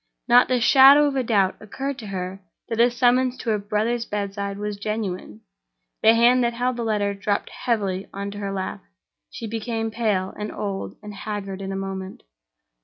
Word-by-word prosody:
Not 245 +1 +6
the 255 -1 +1
shadow 275 +4 +7
of 285 -2 0
a 265 - +2
doubt 205 -6 +1
occurred 270 +6 -5
to 220 - -8
her 190 0 -5 0.3
that 225 - -2
the 235 +1 +5
summons 250 +1 +2
to 230 - -2
her 210 - +1
brother's 215 +4 -1
bedside 200 -2 -4
was 210 0 -4
genuine. 200 - -4 0.6
The 225 +1 +6
hand 245 +2 +5
that 235 0 0
held 250 +1 -1
the 235 - -2
letter 205 -2 0
dropped 200 +1 -2
heavily 200 -6 -2
into 200 +1 -5
her 200 -1 -3
lap; 190 - -4 0.5
she - - -7
became 225 0 -3
pale, 210 -5 -1
and 210 0 -5
old, 195 -2 -4
and 210 0 -8
haggard 200 -1 -5
in 195 0 -4
a - - -3
moment. 195 0 -6
210 Hz, 180 wpm, -23 LUFS, 200-235 Hz, 0.6 s, shadow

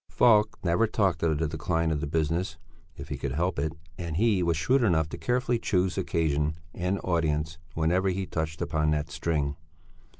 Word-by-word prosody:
Falk 110 -3 +4
never 90 +6 +3
talked 95 -7 +1
of 80 -2 +2
the 80 +1 0
decline 80 +2 -1
of 75 -2 -1
the 80 - -2
business 80 +2 -1 0.4
if - - -9
he - - -3
could 70 -1 -3
help 85 +2 0
it, 75 +2 -1 0.3
and 85 -2 -3
he 105 -2 +3
was 85 -2 +1
shrewd 125 +11 +2
enough 80 -8 +2
carefully 125 +2 0
to - - -22
choose 90 -2 +1
occasion 80 -5 0 0.2
and 90 +2 -1
audience 80 -2 0 0.2
whenever 90 +4 +2
he 95 +1 -1
touched 80 -2 -3
upon 75 -1 0
that 75 0 -1
string. 75 -4 -1
85 Hz, 180 wpm, -28 LUFS, 80-95 Hz, 0.4 s, Falk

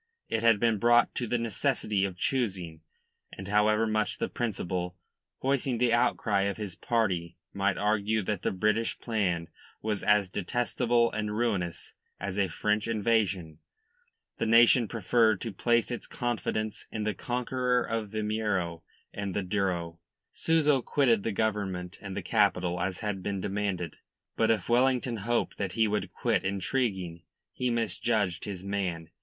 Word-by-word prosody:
It 110 - 0
had 115 -2 +5
been 115 -2 +2
brought 120 +2 +4
to 120 - -2
the 120 - +1
necessity 115 -3 0
of 95 -2 -5
choosing, 95 -11 -1 0.5
and 95 - -8
however 105 +2 +3
much 110 +1 0
the - - -2
Principal, 90 -6 -3 0.5
voicing 135 -2 +1
the 120 0 +2
outcry 105 -3 +2
of 100 - -4
his 105 -4 -4
party, 90 -8 -1 0.2
might 100 -1 +1
argue 105 +1 +1
that 100 -1 -2
the - - 0
British 105 +4 0
plan 90 -8 -1 0.3
was 105 -2 -2
as 105 -2 +3
detestable 115 +4 +1
and 105 0 -2
ruinous 95 -8 -2 0.3
as 100 0 -3
a 100 - +3
French 105 +5 0
invasion, 100 -8 0 0.8
the - - 0
nation 115 +1 +6
preferred 110 -1 +2
to 115 -3 -4
place 120 +2 +1
its 120 - -5
confidence 110 -3 -2
in 110 - -3
the 105 0 0
conqueror 125 +1 0
of 115 -2 -3
Vimeiro 105 -6 -1 0.3
and 100 -2 -4
the 100 - 0
Douro. 90 -4 -1 0.3
Souza 150 -4 +2
quitted 120 -5 +2
the 115 - -2
Government 100 -4 -2
and 95 -2 -6
the - - -3
capital 90 -5 +2
as 90 0 -2
had 105 -3 -2
been 100 +1 -2
demanded. 95 -4 -2 0.4
But 115 - +2
if 110 -1 +1
Wellington 125 0 +2
hoped 115 +3 -1
that 95 -3 -2
he 110 +1 +3
would 100 -3 -2
quit 110 -1 0
intriguing, 95 -3 -1 0.3
he 125 -1 -1
misjudged 110 -5 0
his 95 -2 -6
man. 90 -5 -3
105 Hz, 150 wpm, -29 LUFS, 95-115 Hz, 0.8 s, nation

